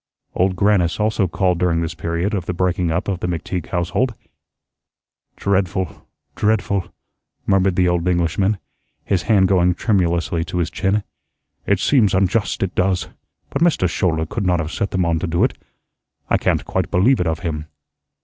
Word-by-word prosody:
Old 95 +1 +1
Grannis 95 -3 +2
also 105 -2 +1
called 90 0 0
during 85 -2 +1
this 85 +1 -3
period 85 +4 -2
of 95 -4 -2
the 90 - -2
breaking 90 -1 0
up 85 +3 -1
of 95 -3 -1
the 90 - -2
McTeague 90 0 -3
household. 95 +8 -1 1.2
"Dreadful, 95 -2 -1 0.3
dreadful," 100 -3 0 0.5
murmured 95 -1 +2
the 90 -1 +3
old 90 0 0
Englishman, 90 +4 +1 0.5
his 95 -3 +1
hand 100 -4 +3
going 90 -2 +3
tremulously 85 -5 +1
to 90 - -4
his 85 -1 -1
chin. 100 +1 0 0.6
"It 100 -2 +2
seems 105 -4 +3
unjust; 100 +3 +1
it 95 -1 -2
does. 90 0 0 0.4
But - - -2
Mr. 165 - +3
Schouler 80 -2 0
could 100 +6 -4
not 90 -1 +2
have 80 0 -3
set 100 - -2
them 95 -2 0
on 85 -1 +1
to 90 - -2
do 85 +1 +1
it. - - +1 0.8
I - - +5
can't - - 0
quite - - -1
believe 120 +9 +3
it 90 - 0
of 80 0 -2
him." 75 -4 -4
90 Hz, 170 wpm, -20 LUFS, 85-100 Hz, 1.2 s, I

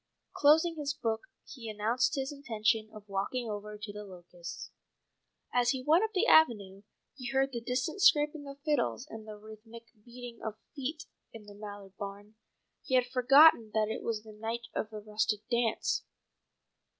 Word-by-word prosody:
Closing 320 +3 +4
his 285 -1 -2
book 225 -3 -2 0.2
he 235 -5 -8
announced 225 +7 +1
his 270 0 -2
intention 225 -5 0
of 215 -1 -12
walking 200 +5 -2
over 210 0 -5
to 210 0 -7
The 210 0 -7
Locusts. 175 -3 -9 0.8
As 245 -1 +3
he 255 0 0
went 325 +6 +5
up 440 0 -2
the 370 - +3
avenue 205 -11 +4 0.3
he 255 -2 -7
heard 270 0 +1
the 235 -2 -4
distant 255 +10 -2
scraping 295 -4 +4
of 275 0 -8
fiddles 280 -4 0
and 220 -3 -9
the 215 -1 -8
rhythmic 220 +2 -13
beating 240 0 -10
of 220 -1 -4 0.2
feet 300 +3 -4 0.3
in 225 -2 -10
the 205 0 -12
Mallard 205 -2 -10
barn. 205 +1 -7 0.5
He 260 - 0
had 250 -1 +4
forgotten 255 -1 +6
that 215 -1 +2
it 220 - -3
was 220 -2 -3
the 215 -1 -12
night 225 +2 -4
of 215 - -2
the 215 -1 -8
rustic 210 0 -1
dance. 235 -2 +1
230 Hz, 170 wpm, -31 LUFS, 210-270 Hz, 0.8 s, forgotten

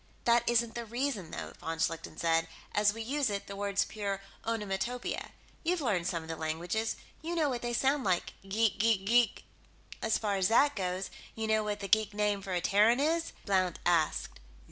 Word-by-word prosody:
"That 235 0 +4
isn't 235 -1 +2
the 235 - -4
reason, 235 - -2
though," - - -6
von 165 0 -4
Schlichten 165 0 -2
said. 165 0 +2 0.3
"As 210 0 +4
we 225 +2 -5
use 275 +2 0
it, 200 -1 -3
the 200 - -7
word's 200 0 +1
pure 200 -2 -3 0.2
onomatopoeia. 225 +2 -2 0.3
You've 350 +2 +1
learned 200 - 0
some 170 -3 -2
of - - -11
the 165 - -3
languages; 170 +8 -2 0.3
you 335 +3 -3
know 310 -3 +2
what 245 -3 -2
they 240 - -2
sound 270 +3 +2
like. 185 -3 0
Geek 210 +2 +1
geek 215 -3 +3
geek." 240 +2 +3 0.6
"As 220 - +2
far 205 -2 0
as 190 -1 +3
that 285 +7 +4
goes, 185 -1 -2 0.2
you 225 - -2
know 220 0 +2
what 210 0 -3
the 200 - -3
geek 210 0 +3
name 205 -1 +1
for 190 -1 -4
a 175 - +1
Terran 210 +7 +4
is?" 330 +3 +1
Blount 185 -3 +2
asked. 165 - +1
210 Hz, 195 wpm, -31 LUFS, 190-235 Hz, 0.6 s, That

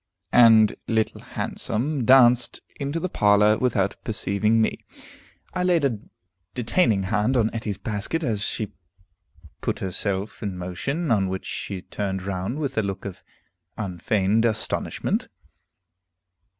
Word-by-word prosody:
And 110 -3 +7
Little 110 -1 0
Handsome 130 +3 -2
danced 125 -1 +5 0.2
into 140 +3 -2
the 185 - -2
parlor, 105 - +4
without 105 -6 0
perceiving 110 0 0
me. 110 - 0 0.7
I 180 - -1
laid 175 -5 +3
a 120 -6 0 0.6
detaining 115 - +2
hand 105 +7 +1
on 115 -2 +1
Etty's 110 -4 -3
basket 105 - -2
as 110 -7 -1
she 105 0 -1 0.9
put - - -1
herself 95 +2 -2
in 100 -4 -4
motion, 125 - -3
on 100 -4 +2
which 95 0 -4
she 95 -2 -5
turned 95 -2 -4
round 95 +6 -3
with 140 -6 -2
a - - +3
look 100 -1 -4
of 100 -3 -7 0.6
unfeigned 100 +2 0
astonishment. 110 -2 -1
110 Hz, 125 wpm, -24 LUFS, 100-125 Hz, 0.9 s, And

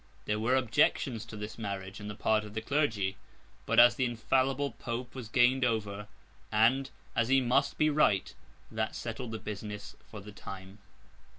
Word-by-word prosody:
There 105 0 0
were 120 +4 +2
objections 120 -1 +1
to 110 -1 -9
this 105 +2 -7
marriage 100 -2 -5
on 105 - -6
the 105 - -6
part 110 +1 +1
of 105 0 -10
the 110 - -1
clergy; 110 -8 0 0.5
but, - - +4
as 120 0 +9
the 130 0 0
infallible 130 +4 +1
Pope 120 0 -5
was 125 -5 -7
gained 130 +2 +4
over, 105 -4 -1 0.4
and, 120 +5 +3 0.3
as 120 -1 +2
he 135 +1 +5
must 135 +3 +1
be 155 0 +3
right, 125 -10 +2 0.4
that 110 0 -2
settled 120 +1 -5
the 110 - -4
business 105 -1 -7
for 105 - -8
the 105 +1 -10
time. 95 0 -10
115 Hz, 175 wpm, -31 LUFS, 105-130 Hz, 0.5 s, as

